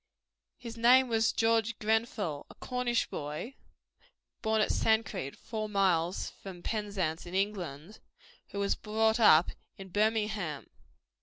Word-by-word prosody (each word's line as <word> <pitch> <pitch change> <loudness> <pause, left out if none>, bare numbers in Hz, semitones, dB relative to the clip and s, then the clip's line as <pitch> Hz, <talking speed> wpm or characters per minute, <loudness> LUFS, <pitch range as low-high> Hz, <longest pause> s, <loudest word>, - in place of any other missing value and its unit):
His 235 -2 -9
name 250 +2 +5
was 225 -1 +2
George 225 -1 +1
Grenfell, 215 -8 -1
a - - -14
Cornish 250 -2 -1
boy 150 - -5 0.9
(born 220 -1 +1
at 215 - +2
Sancreed, 220 -10 0
four 215 -2 -5
miles 185 -3 +1
from 180 -3 -9
Penzance, 195 -7 -2
in 175 - -7
England), 190 -3 -3 0.5
who - - -8
was 200 0 +1
brought 220 +1 +1
up 170 -6 +6 0.3
in 195 -1 -10
Birmingham. 210 -6 -1
210 Hz, 125 wpm, -30 LUFS, 180-225 Hz, 0.9 s, up